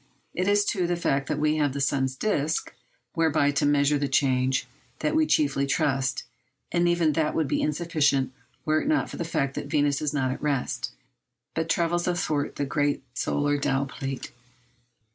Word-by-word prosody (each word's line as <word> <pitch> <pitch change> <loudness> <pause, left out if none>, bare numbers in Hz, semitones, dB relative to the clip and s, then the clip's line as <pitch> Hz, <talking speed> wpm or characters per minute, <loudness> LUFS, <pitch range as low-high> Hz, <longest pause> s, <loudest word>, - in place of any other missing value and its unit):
It 180 +2 -1
is 205 0 +3
to 180 -4 0
the 175 - +1
fact 135 -5 0
that 150 - -1
we 150 +1 +1
have 145 -3 +1
the 140 - -3
sun's 135 -1 0
disc, 155 -3 -1 0.4
whereby 160 -3 +2
to 145 0 +1
measure 145 0 +3
the 140 - 0
change, 130 -1 +2 0.3
that - - -1
we 315 -1 +3
chiefly 140 -2 +2
trust; 135 -1 0 0.5
and 175 0 +2
even 170 -3 +2
that 155 -1 0
would 160 -3 +1
be - - 0
insufficient 145 -4 +1 0.3
were 155 0 +2
it - - -4
not 310 0 +1
for - - -7
the - - -2
fact 140 -4 -1
that - - -5
Venus 145 -2 +1
is 150 -2 0
not 135 -3 0
at 130 - -5
rest, 140 -3 -1 0.6
but 160 0 -2
travels 175 +1 +1
athwart 155 -5 -1
the 145 - -1
great 145 0 0
solar 145 +3 0
dial 135 0 +1
plate. 135 0 -6
145 Hz, 180 wpm, -26 LUFS, 140-165 Hz, 0.6 s, is